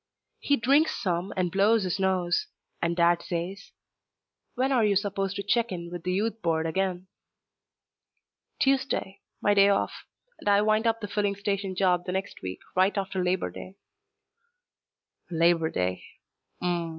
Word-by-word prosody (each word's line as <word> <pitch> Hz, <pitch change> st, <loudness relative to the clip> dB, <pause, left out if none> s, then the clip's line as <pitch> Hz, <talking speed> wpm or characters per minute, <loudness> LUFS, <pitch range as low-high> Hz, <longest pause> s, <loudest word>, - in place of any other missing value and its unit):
He 285 Hz, -, +2 dB
drinks 280 Hz, +7 st, +3 dB
some 185 Hz, -2 st, -1 dB
and 180 Hz, -2 st, 0 dB
blows 205 Hz, +3 st, +3 dB
his 185 Hz, +1 st, -2 dB
nose, 190 Hz, -, +1 dB, 0.3 s
and 170 Hz, 0 st, 0 dB
Dad 170 Hz, 0 st, +3 dB
says, 180 Hz, +3 st, -5 dB, 0.8 s
"When 260 Hz, +2 st, +1 dB
are 250 Hz, -4 st, +3 dB
you 205 Hz, -1 st, +3 dB
supposed 195 Hz, -1 st, -1 dB
to 200 Hz, -, -3 dB
check 230 Hz, +3 st, +1 dB
in 170 Hz, -1 st, -6 dB
with 175 Hz, -1 st, -6 dB
the 180 Hz, -, -2 dB
Youth 215 Hz, +4 st, -1 dB
Board 160 Hz, -1 st, 0 dB
again?" 185 Hz, +2 st, -1 dB, 1.5 s
"Tuesday. 270 Hz, -8 st, 0 dB, 0.2 s
My 205 Hz, -, +4 dB
day 200 Hz, 0 st, +6 dB
off. 200 Hz, -, +1 dB, 0.5 s
And -, -, -1 dB
I 205 Hz, 0 st, +5 dB
wind 215 Hz, +2 st, +2 dB
up 230 Hz, 0 st, +1 dB
the 205 Hz, -, -4 dB
filling 205 Hz, -1 st, 0 dB
station 200 Hz, -1 st, -2 dB
job 180 Hz, -2 st, +2 dB
the 180 Hz, -, -2 dB
next 190 Hz, +1 st, -4 dB
week, 95 Hz, 0 st, -6 dB
right 190 Hz, +3 st, +3 dB
after 190 Hz, -1 st, -1 dB
Labor 180 Hz, +1 st, 0 dB
Day." 185 Hz, -, -10 dB, 1.5 s
"Labor 165 Hz, -1 st, +3 dB
Day. 90 Hz, -, -2 dB, 0.6 s
Hm 180 Hz, -, -2 dB
m. 170 Hz, -1 st, -3 dB
195 Hz, 160 wpm, -27 LUFS, 175-205 Hz, 1.5 s, day